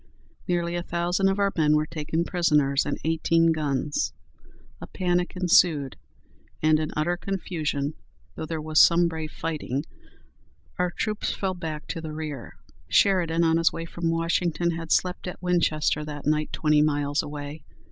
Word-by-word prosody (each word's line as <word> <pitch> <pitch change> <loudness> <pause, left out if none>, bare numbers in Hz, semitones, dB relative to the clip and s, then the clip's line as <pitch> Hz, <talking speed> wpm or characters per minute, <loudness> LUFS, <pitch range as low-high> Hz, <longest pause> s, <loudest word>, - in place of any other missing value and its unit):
Nearly 175 -1 0
a 175 - -1
thousand 175 +3 0
of 195 - 0
our 200 -1 +2
men 150 -2 +3
were 150 0 +2
taken 160 +1 -2
prisoners, 150 -6 +2
and - - -2
eighteen 165 +1 +2
guns. 145 -2 -1 0.7
A - - -7
panic 180 -1 -1
ensued, 170 -6 +3 0.6
and 155 0 +3
in 155 -1 -2
utter 155 +4 +1
confusion, 160 -6 -3 0.4
though 160 - -6
there 160 0 -3
was 155 0 +1
some 170 0 +6
brave 160 -2 -5
fighting, 150 -3 -3 0.9
our 180 0 +2
troops 210 +4 -2
fell 190 -1 -1
back 160 -4 -6
to 165 - -4
the 155 -1 -6
rear. 145 - -6 0.3
Sheridan, 170 -4 +3
on 165 0 +3
his 165 0 +3
way 165 - -5
from 165 0 -3
Washington, 170 0 0
had 165 -1 -5
slept 180 0 +1
at 180 - -6
Winchester 160 -4 +1
that 150 -1 -7
night, 150 +1 +1
twenty 150 -1 +3
miles 145 -1 +1
away. 145 +1 -7
160 Hz, 155 wpm, -25 LUFS, 150-175 Hz, 0.9 s, some